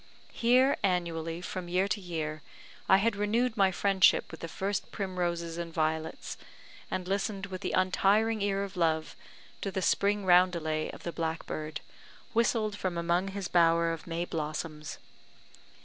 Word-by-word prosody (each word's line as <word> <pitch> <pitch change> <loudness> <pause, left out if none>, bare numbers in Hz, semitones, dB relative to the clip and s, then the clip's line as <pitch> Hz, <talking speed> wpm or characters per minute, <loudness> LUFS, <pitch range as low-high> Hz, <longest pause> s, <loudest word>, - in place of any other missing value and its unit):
Here 255 +3 +4
annually, 170 -3 -1
from 185 0 -5
year 185 +2 +2
to 200 +2 -1
year, 155 -4 -4 0.5
I 190 - +8
had 215 +2 +1
renewed 220 +4 +1
my 195 -3 +4
friendship 195 0 +3
with 160 - -9
the 165 - -5
first 195 +4 -3
primroses 175 -4 -2
and 170 -1 -4
violets, 160 0 -2 0.5
and 185 -1 -3
listened 195 0 -1
with 190 -1 -7
the - - -2
untiring 205 +4 +2
ear 200 0 0
of 200 0 -7
love 160 -2 0 0.5
to 200 - -2
the 190 -1 -2
spring 200 +2 +2
roundelay 175 -4 +3
of - - -10
the 170 - -3
blackbird, 160 -2 -4 0.5
whistled 225 -2 +1
from 185 -4 -3
among 170 +2 +1
his 195 -1 -4
bower 165 -1 +3
of 165 - -8
May 170 +1 -2
blossoms. 155 -1 -4
180 Hz, 150 wpm, -30 LUFS, 165-200 Hz, 0.5 s, I